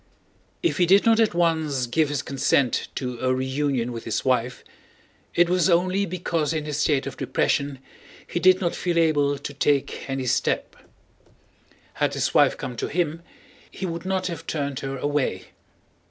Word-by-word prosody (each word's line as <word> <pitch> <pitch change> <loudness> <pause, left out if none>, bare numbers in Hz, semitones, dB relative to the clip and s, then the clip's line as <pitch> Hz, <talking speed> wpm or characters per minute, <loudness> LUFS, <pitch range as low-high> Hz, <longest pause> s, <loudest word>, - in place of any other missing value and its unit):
If 345 - +1
he 175 - +4
did 195 +3 +5
not 225 0 +5
at 220 -5 +2
once 160 -6 +1
give 150 +5 +1
his 145 -1 -2
consent 135 -2 +1
to 125 -3 -4
a 130 0 +1
reunion 130 -2 -1
with 115 -1 -6
his 115 - -2
wife, 125 -1 0 0.7
it 175 0 +5
was 180 0 +2
only 185 +3 +2
because 165 -3 -1
in 155 -1 -2
his 150 -2 -3
state 145 -2 +1
of - - -6
depression 140 -1 0 0.5
he - - -3
did 185 +1 +5
not 175 -4 -1
feel 175 -2 -1
able 145 -4 +2
to 140 0 -7
take 140 0 0
any 135 -1 -2
step. 125 - 0 1.2
Had - - 0
his - - -1
wife - - +4
come 125 -2 -5
to - - -2
him, 165 -1 -1 0.5
he 190 - -6
would 170 -2 -4
not 190 0 -1
have 165 -2 -5
turned 140 -3 -2
her 135 0 -4
away. 145 0 -1
150 Hz, 170 wpm, -24 LUFS, 135-175 Hz, 1.2 s, did